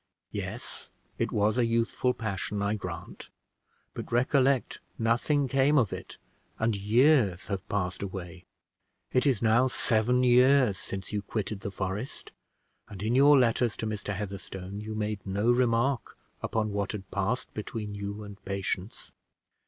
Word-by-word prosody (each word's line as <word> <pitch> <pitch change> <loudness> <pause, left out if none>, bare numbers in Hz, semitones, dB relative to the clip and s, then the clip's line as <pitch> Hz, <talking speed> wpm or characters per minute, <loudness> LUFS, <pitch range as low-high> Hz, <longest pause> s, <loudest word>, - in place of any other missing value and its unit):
"Yes, - - -5 0.3
it - - 0
was 105 +3 +2
a 120 - +4
youthful 115 +2 +1
passion, 105 -2 -3
I 100 +1 +1
grant; 90 -5 -7 0.6
but - - -7
recollect 130 +2 +2 0.2
nothing 120 +5 +2
came 135 +3 +3
of 115 -7 +2
it, - - -8 0.4
and 110 -1 +1
years 105 - +3
have 100 -3 -4
passed 90 -3 -1
away. 95 -2 -6 0.7
It 130 +3 +3
is 120 -6 +2
now 115 +3 +4
seven 125 0 +2
years 125 -4 +5
since 95 +2 -6
you 105 - 0
quitted 105 0 -3
the 100 - -4
forest, 100 +6 -5 0.6
and 100 -1 -7
in 110 +2 +1
your 140 +3 +7
letters 120 -2 +2
to - - -3
Mr. 105 -2 -3
Heatherstone 100 -1 -6
you 110 0 -5
made 105 -2 -2
no 100 +5 +1
remark 120 +1 +1 0.2
upon 110 -1 -1
what 100 +1 -2
had 95 -3 -7
passed 105 +6 -1
between 105 -1 -5
you 100 +1 -5
and 100 -1 -11
Patience. 95 0 -4
110 Hz, 145 wpm, -29 LUFS, 100-125 Hz, 0.7 s, your